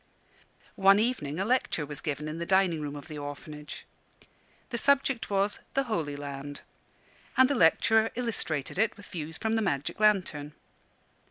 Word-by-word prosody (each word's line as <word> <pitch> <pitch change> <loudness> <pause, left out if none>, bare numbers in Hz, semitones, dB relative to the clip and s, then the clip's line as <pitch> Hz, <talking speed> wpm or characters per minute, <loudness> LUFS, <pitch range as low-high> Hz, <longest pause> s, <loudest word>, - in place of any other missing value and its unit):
One 195 +1 +7
evening 205 - -1
a 195 - 0
lecture 230 -9 +1
was 145 -1 -6
given 150 0 -3
in 155 +2 -5
the 170 - -2
dining 190 -4 +3
room 145 -1 -4
of 145 +1 -9
the 155 -3 -7
Orphanage. 150 +1 -8 0.9
The 235 - -1
subject 275 -2 +2
was 200 +1 +1 0.2
"The 275 - +3
Holy 165 - -2
Land," 145 0 -7 0.8
and 260 - +7
the 285 - +1
lecturer 220 +2 +4
illustrated 195 - -2
it 220 -1 +2
with 205 - -11
views 160 -1 -5
from 220 0 -1
the 225 - +2
magic 145 -7 -1
lantern. 180 -9 +2
175 Hz, 160 wpm, -29 LUFS, 150-220 Hz, 0.9 s, One